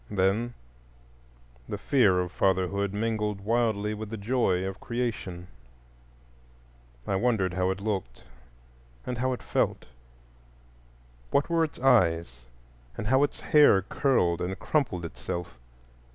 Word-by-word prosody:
Then 105 Hz, +5 st, 0 dB, 1.1 s
the -, -, -3 dB
fear 100 Hz, -10 st, +3 dB
of 90 Hz, -1 st, -4 dB
fatherhood 95 Hz, +1 st, +1 dB
mingled 105 Hz, -1 st, -1 dB
wildly 110 Hz, -1 st, 0 dB
with 105 Hz, 0 st, -6 dB
the 110 Hz, -, -5 dB
joy 100 Hz, -4 st, +1 dB
of 95 Hz, 0 st, -5 dB
creation; 115 Hz, -7 st, -4 dB, 1.6 s
I 95 Hz, -, -1 dB
wondered 100 Hz, -5 st, +1 dB
how 90 Hz, +1 st, 0 dB
it 95 Hz, 0 st, -2 dB
looked 95 Hz, -, -4 dB, 0.8 s
and 125 Hz, -2 st, -4 dB
how 130 Hz, +1 st, +1 dB
it 125 Hz, -, -4 dB
felt—what -, -, -5 dB
were 165 Hz, -1 st, +3 dB
its 155 Hz, -, -4 dB
eyes, 85 Hz, -, +2 dB, 0.5 s
and -, -, -4 dB
how 130 Hz, +1 st, +4 dB
its 145 Hz, -1 st, 0 dB
hair 145 Hz, -11 st, +5 dB
curled 90 Hz, -, +1 dB
and 95 Hz, +2 st, -3 dB
crumpled 125 Hz, -, -1 dB
itself. 80 Hz, +1 st, -6 dB
95 Hz, 120 wpm, -27 LUFS, 85-115 Hz, 1.6 s, hair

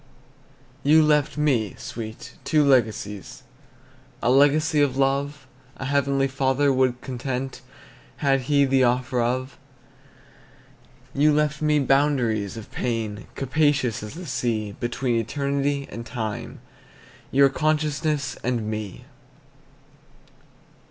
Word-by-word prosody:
You 155 Hz, +2 st, +5 dB
left 150 Hz, -1 st, +2 dB
me, 130 Hz, -9 st, +1 dB
sweet, 110 Hz, -1 st, -8 dB
two 155 Hz, -2 st, +3 dB
legacies, 110 Hz, -6 st, 0 dB, 0.8 s
A 120 Hz, -, +3 dB
legacy 145 Hz, +3 st, +4 dB
of 135 Hz, -2 st, +1 dB
love 140 Hz, +1 st, 0 dB, 0.3 s
A 135 Hz, -, -5 dB
Heavenly 140 Hz, 0 st, +1 dB
Father 135 Hz, +1 st, +1 dB
would 130 Hz, -1 st, +1 dB
content, 130 Hz, +1 st, -4 dB, 0.6 s
Had 135 Hz, -2 st, +2 dB
He 140 Hz, -1 st, +4 dB
the 135 Hz, -1 st, +3 dB
offer 125 Hz, 0 st, +1 dB
of; 130 Hz, +2 st, -2 dB, 1.5 s
You 150 Hz, +2 st, +4 dB
left 150 Hz, 0 st, +1 dB
me 150 Hz, -1 st, +3 dB
boundaries 130 Hz, -7 st, +1 dB
of 110 Hz, -, -10 dB
pain 115 Hz, -3 st, -3 dB
Capacious 135 Hz, -3 st, +1 dB
as 105 Hz, +6 st, -8 dB
the 180 Hz, +2 st, -8 dB
sea, 110 Hz, -7 st, -2 dB
Between 120 Hz, 0 st, -1 dB
eternity 140 Hz, +3 st, -1 dB
and 115 Hz, +3 st, -6 dB
time, 110 Hz, -2 st, -5 dB, 0.7 s
Your 140 Hz, +1 st, +5 dB
consciousness 150 Hz, -2 st, -1 dB
and 120 Hz, -3 st, -1 dB
me. 105 Hz, -3 st, -5 dB
135 Hz, 110 wpm, -24 LUFS, 120-145 Hz, 1.5 s, You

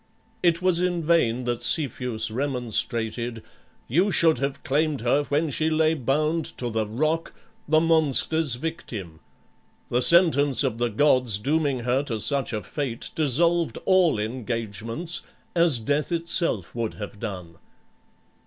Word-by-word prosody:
It 170 Hz, 0 st, +2 dB
was 185 Hz, -2 st, +4 dB
in 175 Hz, -2 st, -1 dB
vain 130 Hz, -7 st, +2 dB
that 120 Hz, -1 st, -2 dB
Cepheus 125 Hz, -7 st, +1 dB
remonstrated 120 Hz, -2 st, -1 dB, 0.4 s
"You 175 Hz, -, +2 dB
should 165 Hz, -7 st, +3 dB
have 140 Hz, 0 st, -3 dB
claimed 150 Hz, -1 st, 0 dB
her 140 Hz, +5 st, +1 dB
when 150 Hz, +2 st, 0 dB
she 155 Hz, +3 st, 0 dB
lay 160 Hz, 0 st, +2 dB
bound 155 Hz, +4 st, 0 dB
to 120 Hz, -2 st, -4 dB
the 110 Hz, -1 st, -1 dB
rock, 155 Hz, +9 st, -2 dB, 0.3 s
the 155 Hz, +1 st, +4 dB
monster's 160 Hz, -3 st, +2 dB
victim. 110 Hz, -, -6 dB, 0.7 s
The 125 Hz, -, +1 dB
sentence 145 Hz, -4 st, +4 dB
of 120 Hz, -4 st, -2 dB
the 120 Hz, 0 st, +1 dB
gods 125 Hz, -2 st, +2 dB
dooming 140 Hz, +2 st, 0 dB
her 125 Hz, +3 st, +1 dB
to 115 Hz, -5 st, -3 dB
such 140 Hz, +3 st, 0 dB
a 110 Hz, -2 st, -4 dB
fate 135 Hz, -6 st, -5 dB
dissolved 165 Hz, +3 st, +1 dB
all 185 Hz, -, +3 dB
engagements, 115 Hz, -, -4 dB, 0.3 s
as 170 Hz, -6 st, +4 dB
death 145 Hz, +8 st, -1 dB
itself 170 Hz, -, 0 dB
would 115 Hz, -2 st, -3 dB
have 105 Hz, -1 st, -8 dB
done." 90 Hz, -7 st, -7 dB
140 Hz, 135 wpm, -24 LUFS, 115-160 Hz, 0.7 s, was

